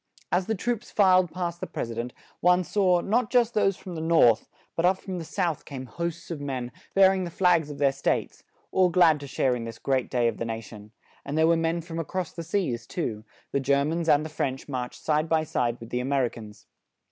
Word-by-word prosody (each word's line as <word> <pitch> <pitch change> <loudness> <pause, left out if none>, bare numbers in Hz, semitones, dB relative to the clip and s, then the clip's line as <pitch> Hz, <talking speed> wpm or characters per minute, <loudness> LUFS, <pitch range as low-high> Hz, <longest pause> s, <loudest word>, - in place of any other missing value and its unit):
As 180 +1 +1
the 220 - 0
troops 240 +3 -2
filed 185 -3 +4
past 175 -1 -3
the - - -4
pres 115 - -4
i - - -4
dent, 120 +2 -4 0.3
one 180 +1 +4
saw, 180 0 +2
not 220 +3 +1
just 240 -2 +3
those 195 -3 +2
from 185 - -9
the 160 - -4
North; 160 -9 +4 0.3
but 165 - 0
up 185 +2 +4
from 185 -2 -6
the - - -5
South 170 -1 -2
came 130 -2 -7
hosts 170 +7 -5
of 155 -4 -4
men, 130 -3 -4 0.2
bearing 190 -1 +5
the 175 - -4
flags 170 -3 +2
of 145 - -7
their 140 -1 +3
states; 135 - -1 0.3
all 185 -1 +4
glad 170 -3 +5
to 140 - -8
share 130 -1 +1
in 120 - -4
this 115 -1 -7
great 130 +2 0
day 120 -2 +2
of 115 - -1
the - - -3
na 115 -1 -3
tion; 105 -1 -12 0.3
and 140 +2 -4
there 160 - +5
were 165 +1 +4
men 165 +1 0
from 165 0 -6
across 175 +2 -3
the 170 - -7
seas 165 - -2
too; 115 - -3 0.3
the 140 - +1
Ger 140 +1 +2
mans 165 +2 -1
and 150 +1 +4
the - - -5
French 135 -3 -3
marched 125 -3 -5
side 155 +1 +1
by 160 -1 +3
side 120 -5 -1
with 115 - -11
the 125 - 0
A 125 - -2
mer 135 -1 +2
i - - -1
cans. 105 -3 -12
160 Hz, 240 wpm, -26 LUFS, 130-180 Hz, 0.3 s, bearing